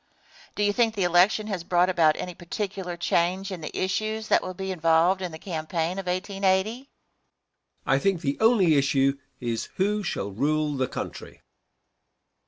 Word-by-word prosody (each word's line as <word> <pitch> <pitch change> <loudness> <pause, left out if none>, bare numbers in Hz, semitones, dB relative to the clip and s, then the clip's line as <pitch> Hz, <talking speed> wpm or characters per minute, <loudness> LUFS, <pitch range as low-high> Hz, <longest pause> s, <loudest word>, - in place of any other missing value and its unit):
Question. - - -27
Do 210 - 0
you 205 0 +2
think 225 0 +2
the 195 - 0
election 180 +5 +3
has 195 -5 -4
brought 175 +1 +3
about 165 -4 +3
any 180 - -5
particular 180 0 -5
change 180 +3 0
in 180 -3 -6
the 155 - -6
issues 215 +3 -2
that - - +4
will 185 - -6
be 190 +1 -4
involved 165 +2 +3
in 180 -2 -3
the 160 - -8
campaign 165 +1 -3
of 190 - -6
1880? 190 +2 +1
Answer. 265 +2 -15 1.0
I 135 - +3
think 185 +2 0
the 140 -4 -2
only 205 -9 +4
issue 135 0 +2 0.2
is 115 -2 -3
who 210 +2 +1
shall 100 - -3
rule 150 +7 0
the 130 -1 0
country. - - -7
180 Hz, 175 wpm, -26 LUFS, 160-195 Hz, 1.0 s, that